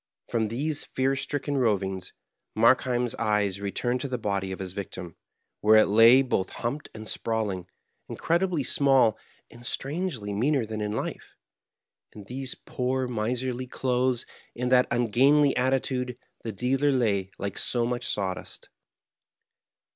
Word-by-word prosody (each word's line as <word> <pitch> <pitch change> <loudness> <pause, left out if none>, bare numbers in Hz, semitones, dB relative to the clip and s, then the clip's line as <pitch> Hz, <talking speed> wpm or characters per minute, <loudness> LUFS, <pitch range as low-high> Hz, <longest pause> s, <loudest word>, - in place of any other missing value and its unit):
From 115 -2 +1
these 145 +7 -1
fear 135 +1 0
stricken 145 +1 -2
rovings, 95 -5 0 0.5
Markheiln's 120 +1 +3
eyes 105 -3 0
returned 120 +5 -1
to 140 - -2
the 130 -1 -2
body 100 -3 -2
of 95 - -4
his 95 -2 -6
victim, 90 -3 -6 0.4
where 110 +1 +5
it 110 - +7
lay 115 +5 +7
both 95 -7 -1
humped 130 +6 -4
and 110 0 -8
sprawling, 105 -7 -1 0.4
incredibly 170 -2 0
small, 130 -4 +4 0.4
and 120 +1 -14
strangely 135 - -3
meaner 130 +4 +1
than 110 0 -5
in 105 0 -2
life. 110 - -5 0.8
In 105 - -10
these 130 +5 -4
poor, 130 +1 -2
miserly 125 +2 -2
clothes, 125 -1 0 0.3
in 125 +1 -2
that 125 0 +5
ungainly 135 +5 +3
attitude, 125 -1 0 0.2
the 115 - -4
dealer 130 +7 +1
lay 105 -7 +1
like 100 0 -4
so 120 -1 +1
much 120 0 -2
saw 95 -2 0
dust. - - -10
120 Hz, 140 wpm, -27 LUFS, 105-130 Hz, 0.8 s, it